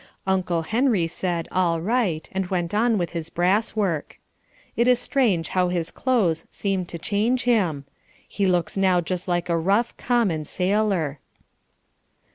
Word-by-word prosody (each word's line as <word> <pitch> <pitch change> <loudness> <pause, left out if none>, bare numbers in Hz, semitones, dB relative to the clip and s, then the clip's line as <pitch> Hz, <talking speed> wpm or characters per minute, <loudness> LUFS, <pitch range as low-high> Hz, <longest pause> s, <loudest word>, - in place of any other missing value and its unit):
Uncle 180 -3 0
Henry 225 -1 +1
said 170 0 -3
all 175 -3 +1
right 190 -4 0
and 190 -1 -2
went 175 -1 -2
on 225 +1 +2
with 175 -3 -2
his 165 -1 -4
brass 190 +7 +1
work. 185 -8 -2 0.6
It 235 - +2
is 250 -1 +5
strange 230 - +1
how 185 -1 +1
his 170 -2 -2
clothes 195 -11 0
seem 190 -3 -2
to 170 - -6
change 215 +8 0
him. 185 - +1 0.4
He 200 -1 -1
looks 180 -2 0
now 190 -2 +3
just 180 +2 -4
like 175 -1 0
a 170 - +1
rough, 200 +8 +1
common 205 -11 0
sailor. 185 -6 0
185 Hz, 150 wpm, -24 LUFS, 170-215 Hz, 0.6 s, is